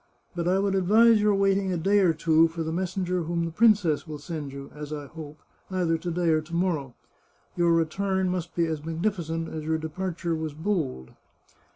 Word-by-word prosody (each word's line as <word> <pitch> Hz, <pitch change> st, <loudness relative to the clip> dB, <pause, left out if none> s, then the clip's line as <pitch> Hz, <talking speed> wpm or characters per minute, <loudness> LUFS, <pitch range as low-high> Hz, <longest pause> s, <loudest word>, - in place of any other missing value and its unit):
But 170 Hz, -1 st, -2 dB
I 185 Hz, +1 st, +3 dB
would 195 Hz, 0 st, +1 dB
advise 215 Hz, +4 st, +5 dB
your 210 Hz, -1 st, +3 dB
waiting 195 Hz, -1 st, +2 dB
a 180 Hz, -, 0 dB
day 195 Hz, +5 st, +3 dB
or 185 Hz, -4 st, +4 dB
two 160 Hz, 0 st, +3 dB
for 165 Hz, 0 st, -5 dB
the 160 Hz, -, -3 dB
messenger 180 Hz, 0 st, -1 dB
whom 170 Hz, 0 st, -1 dB
the 165 Hz, -, -4 dB
princess 190 Hz, -6 st, +3 dB
will 155 Hz, -1 st, -6 dB
send 150 Hz, -2 st, -6 dB
you, 140 Hz, 0 st, -9 dB
as 150 Hz, 0 st, -8 dB
I 145 Hz, -1 st, -5 dB
hope, 150 Hz, +1 st, -10 dB, 0.3 s
either 180 Hz, -3 st, +1 dB
to 175 Hz, -, -4 dB
day 170 Hz, 0 st, 0 dB
or 155 Hz, -1 st, +3 dB
to 160 Hz, +2 st, -8 dB
morrow. 160 Hz, -8 st, -1 dB, 0.6 s
Your 170 Hz, -1 st, +3 dB
return 190 Hz, +4 st, +1 dB
must 180 Hz, -2 st, -3 dB
be 170 Hz, -, +2 dB
as 160 Hz, -2 st, -3 dB
magnificent 165 Hz, -1 st, -2 dB
as 155 Hz, -1 st, -5 dB
your 160 Hz, +1 st, 0 dB
departure 170 Hz, +1 st, -3 dB
was 160 Hz, -2 st, -4 dB
bold. 155 Hz, -, -2 dB
170 Hz, 200 wpm, -26 LUFS, 160-190 Hz, 0.6 s, advise